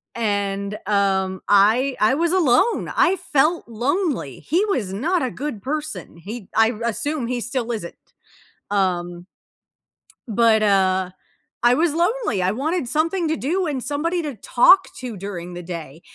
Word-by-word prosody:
And, 200 -2 -2
um, 190 -2 +1
I 225 +7 +4
I 220 +5 +3
was 335 +2 +1
alone. 345 - +2
I 370 +1 +4
felt 310 +3 +1
lonely. 245 - -2
He 355 +8 0
was 245 - -1
not 320 - 0
a 255 - 0
good 260 -7 -5
person. 305 - -5
He 200 +4 -8
I 225 0 +5
assume 235 +4 -2
he 245 -1 -2
still 240 0 -3
isn't. 205 -7 -5 0.7
Um 175 -3 -1 1.0
But, 220 0 +3
uh 190 -2 +2 0.5
I 240 +1 +5
was 315 +3 +2
lonely, 350 - 0
I 180 +1 +1
wanted 295 +3 -2
something 325 +5 0
to 315 - 0
do 345 +6 -1
and 270 -5 -3
somebody 335 +5 -1
to 295 -4 -5
talk 360 - +5
to 245 -5 -6
during 180 -2 -6
the 175 - -6
day, 165 -3 -8
240 Hz, 150 wpm, -22 LUFS, 200-310 Hz, 1.0 s, I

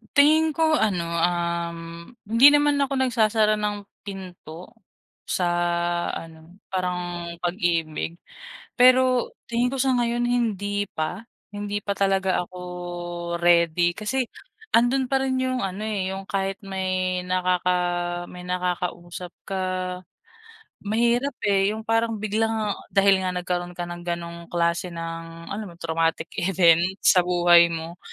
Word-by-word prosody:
Tingin 310 +2 +5
ko 315 -1 +3
ano, 185 -6 +1 0.2
um, 170 -1 -1 0.5
hindi 230 +5 +8
naman 290 0 +3
ako 280 0 0
nagsasara 220 -4 +2
ng 210 0 -1 0.3
pinto 185 -3 -9 0.6
sa 180 - 0 0.7
ano, 165 +3 -10
parang 180 -2 -3
pag-ibig. 170 -2 -1 0.6
Pero 255 0 +5 0.2
tingin 240 +1 +1
ko 270 - -2
sa 265 0 +2
ngayon, 240 0 0
hindi 205 -4 0
pa. 160 +8 -4 0.3
Hindi 205 0 -3
pa 200 - -1
talaga 195 -2 +1
ako 180 - -13 0.8
ready 175 0 +4
kasi 240 +3 -1 0.4
nandun 250 +3 +3
pa 270 -1 +2
rin 260 -1 0
yung 255 -1 -1
ano, 190 +2 -5
eh, 195 -3 -2
yung 195 0 -6
kahit 195 +1 -2
may 185 -1 -1
nakaka 180 0 +1 0.6
may 180 0 -10
nakakausap 180 -1 -3 0.2
ka, 195 -1 -2 1.3
mahirap, 235 +6 +1
eh, 200 0 +3
yung 220 - -6
parang 225 0 +1
biglang 215 0 0 0.2
dahil 195 -1 +5
nga 185 - 0
nagkaroon 180 0 -3
ka 175 - -3
ng 175 0 -7
ganong 170 0 -5
klase 170 +1 0
ng 165 0 -7
alam 210 +1 -4
mo - - -14
traumatic 165 0 0
event 170 -2 +4 0.2
sa 180 - +6
buhay 175 -1 +6
mo. 165 +2 -6
190 Hz, 130 wpm, -24 LUFS, 175-225 Hz, 1.3 s, hindi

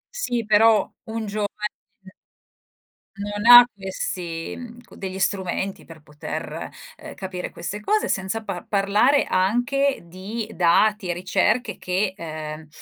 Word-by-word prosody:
Sì, 245 - -2
però, 215 +1 +5 0.2
un 225 -1 -4
giovane 205 0 -2 1.7
non 205 +1 -3
ha 245 0 +12
questi, 180 -4 -5
mhmm, 240 -1 -10
co 240 - -17
degli 190 -1 -5
strumenti 190 0 -2
per 165 -2 -13
poter, 150 -1 -6 0.3
uhm, - - -10
capire 185 -1 -5
queste 195 +5 -6
cose 425 - +1
senza 195 +4 -2
pa 195 -4 -5
parlare 210 +8 +3
anche 245 +9 +1
di 195 +6 -6
dati 190 +3 +3
e 175 - 0
ricerche 210 +5 0
che, 185 +2 -1
ehm, 155 -2 -7
200 Hz, 125 wpm, -23 LUFS, 180-225 Hz, 1.7 s, ha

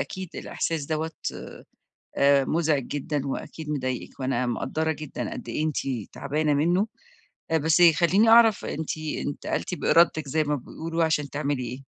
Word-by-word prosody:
أكيد 190 -2 -5
الإحساس 160 -3 -3
دوَّة 160 +1 -2 1.1
آآ، 140 -1 +4
مزعج 155 -4 +1
جدًا 145 -1 -3
وأكيد 150 +3 -5
مضايقِك، 130 -4 -3
وأنا 130 -1 0
مقدّرة 155 +6 -1
جدًا 155 -2 -5
قد - - -8
إيه 155 - -1
أنتِ 155 - -2 0.4
تعبانة 150 +1 0
منُّه، 175 +8 +2 0.7
بس 160 +2 +3
خلّيني 195 +6 +4
أعرف 225 -2 +6
أنتِ 160 +1 -3
انتقلتِ 155 +3 -3
بإرادتِك 165 -4 +3
زي 155 +3 +1
ما 150 0 0
بيقولوا 165 +5 -3
عشان 150 -3 0
تعملي 145 -3 -2
إيه؟ 125 +3 -6
155 Hz, 140 wpm, -26 LUFS, 140-165 Hz, 1.1 s, أعرف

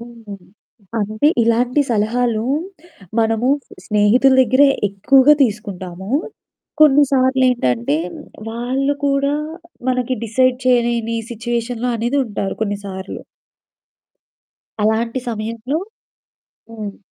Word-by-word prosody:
హ్మ్. 230 -3 -10 0.6
అంటే, 215 +6 0 0.2
ఇలాంటి 240 +4 +2
సలహాలు 225 +1 0 0.8
మనము 225 +3 +1 0.4
స్నేహితుల 215 +6 +3
దగ్గరే 260 +4 +4 0.2
ఎక్కువగా 260 +9 +5
తీసుకుంటాము. 195 -4 -4 0.7
కొన్నిసార్లు 270 -3 +4
ఏంటంటే, 130 - 0 0.5
వాళ్ళు 260 +5 -1
కూడా 280 +1 +1 0.5
మనకి 255 0 0
డిసైడ్ 250 +3 +2
చేయలేని 235 -2 +1
సిచ్యువేషన్‌లో 235 +1 -3
అనేదుంటారు 230 -4 -2
కొన్నిసార్లు. 200 -2 -5 1.6
అలాంటి 230 +3 +1
సమయంలో 230 +5 -3 0.9
హ్మ్. 215 -3 -7
235 Hz, 75 wpm, -19 LUFS, 215-255 Hz, 1.6 s, ఎక్కువగా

